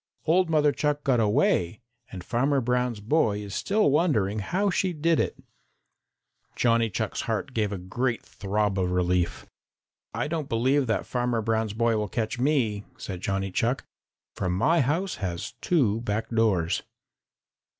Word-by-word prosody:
"Old 175 +2 +3
Mother 150 -2 +4
Chuck 150 0 -1
got 130 -3 +2
away, 105 -3 +2 0.3
and 90 -2 -7
Farmer 135 +6 +1
Brown's 125 -2 0
boy 110 -1 +1
is 100 -1 -7
still 205 - +2
wondering 115 - +2
how 190 - 0
she 185 0 0
did 165 +1 +1
it." - - -1 1.2
Johnny's 115 -3 +2
heart - - -2
gave 105 -2 0
a 100 - -3
great 115 +7 -2
throb 100 0 -1
of 90 -1 +1
relief. 90 -1 0 0.7
"I - - -2
don't 155 -2 -3
believe 130 +4 +2
that 110 -4 0
Farmer 120 -2 -1
Brown's 110 -1 0
boy 115 0 +1
will 105 -1 -2
catch 115 +2 -2
me," 120 -7 +1
said 95 -6 -6
Johnny 95 0 -2
Chuck, 120 +7 0 0.5
"for 90 - -2
my 140 - +3
house 165 +9 -1
has 90 -3 -4
two 115 - +2
back 110 0 -2
doors." 105 -8 +1
115 Hz, 150 wpm, -26 LUFS, 100-145 Hz, 1.2 s, Mother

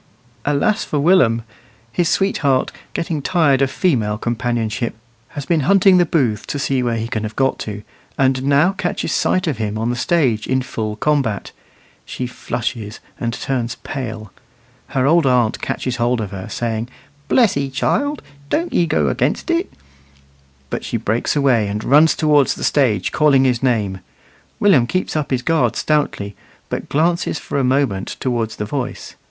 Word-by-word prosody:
Alas 145 +10 +1
for 150 - -3
Willum! 140 -8 +4 0.5
His 170 +7 +1
sweetheart, 140 -9 +1 0.2
getting 165 -3 -2
tired 145 -5 +2
of 135 - +3
female 115 - 0
companionship, 120 -1 -2 0.4
has 145 - -4
been 170 0 +2
hunting 195 +4 +5
the 175 -1 +3
booths 120 -11 +1
to - - -3
see 135 -2 0
where 120 -2 0
he 115 0 -3
can 115 -3 -3
have 110 0 -5
got 135 0 +1
to, 105 -1 -6 0.3
and 130 -1 +2
now 140 +6 +3
catches 180 -2 -3
sight 185 - +1
of 145 -9 -2
him 105 -1 -2
on 115 +2 -1
the - - -2
stage 125 -6 +1
in 130 0 +1
full 110 -4 -4
combat. 135 -6 0 0.5
She 130 - -5
flushes 115 -3 -4 0.2
and 115 -1 -1
turns 120 -1 -2
pale; 110 -7 -5 0.6
her 130 -1 0
old 160 0 +4
aunt 125 -4 +2
catches 125 -1 -3
hold 120 0 +1
of 105 -3 -4
her, 95 -2 -7
saying, 115 0 -3 0.4
"Bless 235 -6 +4
'ee, 140 -1 -1
child, 285 - -1 0.3
doan't 335 +2 -1
'ee 170 - +2
go - - +1
a'nigst - - 0
it;" 340 +3 0 1.0
but - - -3
she - - -2
breaks 115 +7 -1
away 130 -7 +3
and 105 +2 -3
runs 150 +3 +5
towards 150 -3 +3
the - - -7
stage 115 -10 +2
calling 145 -3 +4
his 125 -3 +1
name. 105 -7 0 0.6
Willum 155 -13 +4
keeps 185 +2 -2
up 150 -2 -1
his 125 -2 -1
guard 165 +3 +1
stoutly, 145 -10 -1 0.3
but - - -4
glances 165 +2 +1
for 140 - -3
a - - +1
moment 130 -7 0
towards 120 -4 -1
the 105 - -4
voice. 130 +2 -4
130 Hz, 170 wpm, -19 LUFS, 115-150 Hz, 1.0 s, hunting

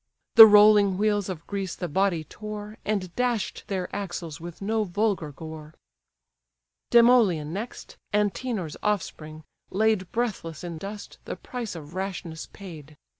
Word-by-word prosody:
The 225 -1 +12
rolling 205 -2 +6
wheels 205 -1 +1
of 170 -3 -6
Greece 195 -3 -4
the 175 - -4
body 180 0 +1
tore, 210 +5 -8
And 195 -4 -2
dash'd 245 -4 -1
their 185 -2 -2
axles 175 -5 -5
with 170 0 -8
no 215 +2 0
vulgar 195 -5 -1
gore. 155 +1 -10 1.1
Demoleon 230 -11 +4
next, 215 +6 -7
Antenor's 210 - -1
offspring, 160 -6 -3 0.3
laid 210 -2 +1
Breathless 195 -10 -3
in 170 -2 -6
dust, 200 +3 -8
the - - -4
price 240 -6 -6
of 155 -1 -10
rashness 180 -4 -5
paid. 155 -6 -11
195 Hz, 130 wpm, -26 LUFS, 165-215 Hz, 1.1 s, The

